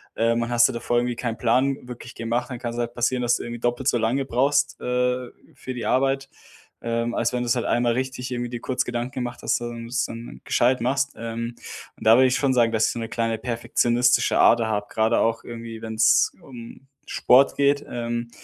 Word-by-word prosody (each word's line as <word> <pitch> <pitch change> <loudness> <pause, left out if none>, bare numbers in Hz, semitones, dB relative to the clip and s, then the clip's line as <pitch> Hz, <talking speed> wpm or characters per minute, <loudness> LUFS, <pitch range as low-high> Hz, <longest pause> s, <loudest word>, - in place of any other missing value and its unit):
Ähm 115 +1 +1
und 115 - -4
hast 120 0 +4
dir - - -4
da 115 - -4
vorher 120 0 +1
irgendwie 120 -1 -2
keinen 115 -2 -3
Plan 125 +2 +1
wirklich 125 0 -9
gemacht, 120 +2 -3
dann 120 - -5
kann 120 -2 -4
es - - -7
halt 120 0 -2
passieren, 125 +1 0
dass 120 - +2
du - - -7
irgendwie 120 0 -6
doppelt 120 +2 -1
so 125 - +3
lange 120 +4 0
brauchst, 140 +3 +1
äh, 125 0 -1 0.3
für 130 - -7
die 120 - -5
Arbeit, 135 +1 +1 0.5
ähm, 115 0 -1
als 115 - 0
wenn 125 - -1
du's 120 0 +1
halt 120 - -2
einmal 120 -1 +1
richtig 130 0 -3
irgendwie 120 -1 -3
dir 120 - -4
kurz 130 0 -1
Gedanken 120 +1 -3
gemacht, 125 -1 -4
hast, - - +1
und 120 -1 -6
du - - -10
es 120 -1 0
dann 115 +1 -9
gescheit 125 0 +2
machst. 135 +3 0
Ähm, 115 +1 -5 0.4
und - - -11
da 115 - +8
würde 130 +1 +5
ich 130 - +1
schon 135 -2 +1
sagen, 120 -2 +3
dass 110 -1 +2
ich - - 0
so 120 - -5
'ne 115 0 -5
kleine 115 -1 -1
perfektionistische 120 +1 +1
Ader 115 -1 +5
habe, 105 -1 -1
gerade 110 0 +1
auch 115 0 0
irgendwie, 115 -1 -8
wenn's 110 0 +3
um 120 -2 -11 0.3
Sport 130 +3 +4
geht. 140 0 +2
Ähm 120 0 -4
120 Hz, 225 wpm, -24 LUFS, 115-125 Hz, 0.5 s, da